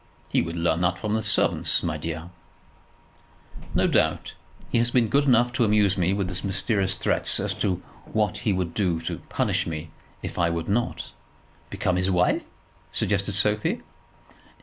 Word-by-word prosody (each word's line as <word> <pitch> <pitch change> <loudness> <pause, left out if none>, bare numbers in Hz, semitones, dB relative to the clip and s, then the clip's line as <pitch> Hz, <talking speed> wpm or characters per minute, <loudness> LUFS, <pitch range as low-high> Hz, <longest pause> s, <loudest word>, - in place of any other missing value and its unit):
"He - - +2
would 85 0 -4
learn 85 0 +1
that 90 +1 +1
from 105 -1 -2
the 110 - +1
servants, 110 0 +1
my 80 -3 -1
dear." 80 +2 -5 1.4
"No - - +3
doubt. - - +1 0.4
He 115 - +3
has 120 +1 +2
been 120 -2 +2
good 140 +1 +3
enough 120 -2 +4
to 120 - +2
amuse 105 -3 +3
me 90 -1 +1
with 95 -3 -2
mysterious 95 0 0
threats - - +3
as - - 0
to 90 -3 0 0.3
what 105 -1 0
he 105 - 0
would 90 -3 -1
do 90 -6 0
to - - -4
punish - - 0
me 80 0 -5 0.3
if - - -5
I 85 -1 +3
would 85 -1 -3
not 120 +4 -1 0.3
" - - -32
"Become 90 -1 -1
his 90 +1 +1
wife?" 90 -1 +2 0.4
suggested 100 0 0
Sophie. 105 +1 +1
95 Hz, 170 wpm, -25 LUFS, 85-105 Hz, 1.4 s, enough